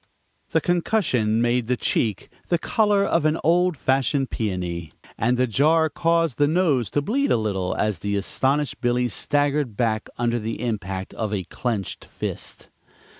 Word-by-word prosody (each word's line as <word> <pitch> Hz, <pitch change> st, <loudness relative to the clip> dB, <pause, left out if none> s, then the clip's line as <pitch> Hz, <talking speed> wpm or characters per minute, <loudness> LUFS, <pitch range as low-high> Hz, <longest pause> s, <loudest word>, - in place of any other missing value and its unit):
The -, -, +2 dB
concussion 150 Hz, -, +1 dB
made 120 Hz, -1 st, +1 dB
the 125 Hz, 0 st, +1 dB
cheek 110 Hz, -4 st, -1 dB, 0.2 s
the 175 Hz, -, +2 dB
color 205 Hz, +3 st, +2 dB
of 165 Hz, -, +1 dB
an 155 Hz, +1 st, +2 dB
old 175 Hz, 0 st, +3 dB
fashioned 135 Hz, +1 st, +1 dB
peony, 90 Hz, -6 st, -3 dB, 0.2 s
and 120 Hz, +2 st, +1 dB
the 130 Hz, -, +3 dB
jar 155 Hz, +7 st, +3 dB
caused 165 Hz, -5 st, +1 dB
the 145 Hz, -, +5 dB
nose 155 Hz, -, +2 dB
to 145 Hz, -, 0 dB
bleed 275 Hz, -, 0 dB
a -, -, +4 dB
little 95 Hz, -4 st, -1 dB
as 105 Hz, -2 st, 0 dB
the 100 Hz, 0 st, -2 dB
astonished 135 Hz, +8 st, 0 dB
Billy 120 Hz, 0 st, +1 dB
staggered 145 Hz, -1 st, 0 dB
back 110 Hz, -3 st, 0 dB
under 120 Hz, 0 st, 0 dB
the 110 Hz, +1 st, -4 dB
impact 95 Hz, -4 st, -3 dB
of 110 Hz, -2 st, -3 dB
a 100 Hz, -3 st, -1 dB
clenched 110 Hz, -1 st, -4 dB
fist. -, -, -6 dB
125 Hz, 160 wpm, -23 LUFS, 110-155 Hz, 0.2 s, the